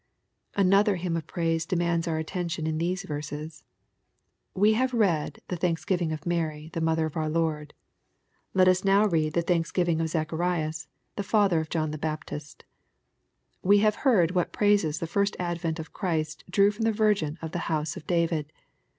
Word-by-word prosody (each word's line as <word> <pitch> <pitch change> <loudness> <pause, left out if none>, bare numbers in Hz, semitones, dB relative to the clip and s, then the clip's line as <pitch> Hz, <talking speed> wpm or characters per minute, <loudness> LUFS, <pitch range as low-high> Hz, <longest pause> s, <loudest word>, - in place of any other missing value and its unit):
44 200 - +3
SXPOSITOBT 185 - +3
THOUGHTS. 205 +2 +5
Anotheb 195 -3 0
hyiDQ - - +1
of 165 - -6
praise 165 -1 -1
demands 170 -1 0
our 160 -1 0
attention 170 0 -3
in 155 0 -1
these 180 +3 -1
rerses. 150 -1 -6 0.9
We 210 +3 +4
have 255 +3 +1
read 175 -9 +1
the 180 - -3
thaoksgiving 170 0 0
of 155 - -4
Mary^ 160 -2 -3
the 165 - -2
mother 160 0 +1
of 155 - -5
our 155 -1 -1
Lord. 155 -2 -1 0.8
Let 185 -1 +5
us 185 0 +3
now 200 +2 +4
read 160 -6 +1
the 170 - +1
thanks 170 -1 0
givmg 170 -3 +1
of 165 - 0
Zacharias^ 160 0 -2 0.3
the - - 0
father 200 -4 +3
of 160 0 -4
John 155 -2 -1
the 155 - -5
Baptist. 155 -1 -5 1.0
We 200 +2 +5
have 215 0 +2
heard 195 - +4
what 180 -2 0
praises 205 -7 +2
the - - -3
first 200 +5 0
advent 170 -2 -2
of 160 -1 -8
Christ 160 -5 -2
drew 200 +3 +4
from 225 +2 -3
the 225 - +3
Virgin 205 -8 +1
of 160 -1 -6
the 175 - -3
house 155 -1 -1
of 155 - -10
David. 165 -3 0
165 Hz, 185 wpm, -27 LUFS, 155-185 Hz, 1.0 s, THOUGHTS